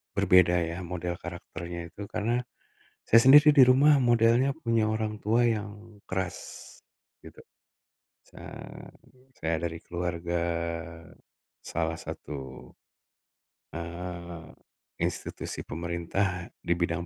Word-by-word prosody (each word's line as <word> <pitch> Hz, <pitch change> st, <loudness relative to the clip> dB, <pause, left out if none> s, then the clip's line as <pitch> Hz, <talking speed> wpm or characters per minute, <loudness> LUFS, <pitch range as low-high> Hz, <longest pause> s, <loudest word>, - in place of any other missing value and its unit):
berbeda 90 Hz, -1 st, +5 dB
ya 85 Hz, +1 st, -3 dB
model 90 Hz, 0 st, -4 dB
karakternya 85 Hz, -1 st, -7 dB
itu, 105 Hz, -, -9 dB
karena 120 Hz, +4 st, 0 dB, 0.6 s
saya 115 Hz, -, +7 dB
sendiri 150 Hz, +3 st, +8 dB
di 135 Hz, -, +9 dB
rumah 140 Hz, +4 st, +6 dB
modelnya 120 Hz, +3 st, +4 dB
punya 115 Hz, -7 st, 0 dB
orang 110 Hz, -1 st, -2 dB
tua 115 Hz, +3 st, +3 dB
yang 105 Hz, -1 st, -4 dB
keras 95 Hz, -1 st, -3 dB, 0.9 s
gitu. -, -, -13 dB, 0.9 s
Sa -, -, -14 dB, 1.0 s
saya 80 Hz, 0 st, 0 dB
dari 85 Hz, -1 st, -6 dB
keluarga 85 Hz, 0 st, -3 dB, 1.2 s
salah 80 Hz, 0 st, -3 dB
satu, 65 Hz, -2 st, -8 dB, 1.0 s
eee, 85 Hz, -1 st, -7 dB, 0.5 s
institusi -, -, -3 dB
pemerintah 85 Hz, +3 st, -2 dB
di 85 Hz, -, 0 dB
bidang 85 Hz, 0 st, -1 dB
90 Hz, 100 wpm, -28 LUFS, 85-115 Hz, 1.2 s, di